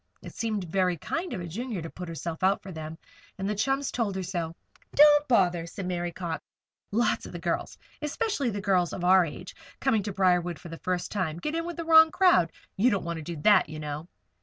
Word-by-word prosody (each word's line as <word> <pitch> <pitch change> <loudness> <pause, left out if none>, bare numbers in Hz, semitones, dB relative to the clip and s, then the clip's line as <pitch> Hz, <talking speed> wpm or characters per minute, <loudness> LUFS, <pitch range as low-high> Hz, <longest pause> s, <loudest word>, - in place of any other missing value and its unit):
It - - -9
seemed 215 -4 -2
very 180 0 0
kind 330 - -3
of 185 - -4
a 175 - -5
Junior 220 +4 -4
to 165 - -6
put 180 -1 -7
herself 165 0 -5
out 190 +2 +2
for 190 - -8
them, 160 -1 -7 0.4
and 195 0 -3
the 210 - 0
chums 270 +6 0
told 220 -5 -1
her 190 - -2
so. 165 -2 -3 0.4
"Don't 295 0 +7
bother," 175 -8 +2
said 190 +2 -6
Mary 175 -1 -2
Cox. 170 -1 -5 0.5
"Lots 235 +4 +1
of - - -11
the - - -4
girls - - -2 0.2
especially 300 - -1
girls 185 -3 +1
of 180 - -5
our 185 +1 +6
age, 170 +3 -7 0.3
coming 250 -6 +2
to 205 +1 -4
Briarwood 180 -3 +2
for 170 - -11
the 165 - -8
first 180 -1 -2
time 175 -6 -2
get 300 - -3
in 330 +1 -2
with 345 - -6
the 335 - -4
wrong 320 0 +8
crowd. 345 - +4 0.3
You 225 +6 +4
don't 200 -7 -1
want 170 -1 -3
to - - -6
do 170 +2 -5
that, 205 -7 +5
you 155 -1 -7
know." 150 +2 -5
190 Hz, 225 wpm, -27 LUFS, 170-240 Hz, 0.5 s, wrong